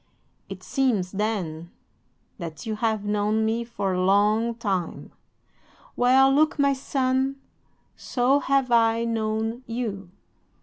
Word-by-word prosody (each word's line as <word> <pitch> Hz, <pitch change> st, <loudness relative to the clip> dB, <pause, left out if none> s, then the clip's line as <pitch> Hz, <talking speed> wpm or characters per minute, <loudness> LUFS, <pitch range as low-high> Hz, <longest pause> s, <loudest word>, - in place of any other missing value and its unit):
"'"It -, -, -8 dB
seems, 230 Hz, -10 st, 0 dB
then, 190 Hz, -6 st, -3 dB, 0.7 s
that 160 Hz, -4 st, -7 dB
you 215 Hz, -1 st, -3 dB
have 220 Hz, -2 st, -1 dB
known 210 Hz, +1 st, 0 dB
me 225 Hz, +2 st, 0 dB
for 205 Hz, -5 st, -3 dB
a 180 Hz, -, 0 dB
long 210 Hz, +4 st, +2 dB
time. 195 Hz, -7 st, -3 dB, 0.8 s
Well, 265 Hz, +2 st, +4 dB
look, 310 Hz, +3 st, +2 dB
my 280 Hz, -1 st, +3 dB
son, 265 Hz, 0 st, -1 dB, 0.6 s
so 260 Hz, +3 st, +1 dB
have 275 Hz, -3 st, 0 dB
I 230 Hz, 0 st, +3 dB
known 225 Hz, +1 st, -2 dB
you." 215 Hz, -6 st, -4 dB
225 Hz, 120 wpm, -25 LUFS, 205-255 Hz, 0.8 s, Well